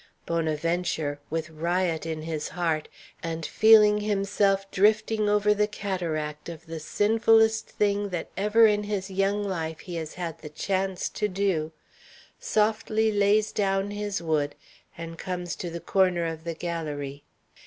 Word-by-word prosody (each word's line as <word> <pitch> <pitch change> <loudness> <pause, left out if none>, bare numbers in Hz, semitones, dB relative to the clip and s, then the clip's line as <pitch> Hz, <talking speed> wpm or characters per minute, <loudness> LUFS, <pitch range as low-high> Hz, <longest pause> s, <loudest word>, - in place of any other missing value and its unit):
Bonaventure, 160 -2 -1
with 160 0 -3
riot 170 +1 -1
in 160 -1 -4
his 160 -2 -3
heart, 165 -3 -1 0.3
and 165 -1 -4
feeling 215 -1 +6
himself 200 -1 +1
drifting 215 +1 +2
over 210 0 +3
the 210 0 +1
cataract 170 -7 -3
of 165 -1 -9
the 165 -1 -6
sinfullest 220 +5 +3
thing 205 0 0
that 175 -3 -4
ever 210 +4 +4
in 210 -1 +3
his 200 -2 -3
young 195 +2 +1
life 160 -5 -3
he 180 - -8
has 160 -1 -5
had 165 -2 -5
the 150 - -9
chance 190 +3 -1
to 210 - -2
do, 185 -5 -1 0.7
softly 220 0 +1
lays 210 +1 +3
down 195 0 0
his 205 -3 -3
wood, 150 -3 0 0.4
and 165 0 -7
comes 180 -2 -4
to 175 - -5
the 170 +1 -5
corner 180 -2 +2
of 160 0 -5
the 165 -1 -3
galérie. 150 -5 -4
185 Hz, 145 wpm, -26 LUFS, 165-205 Hz, 0.7 s, feeling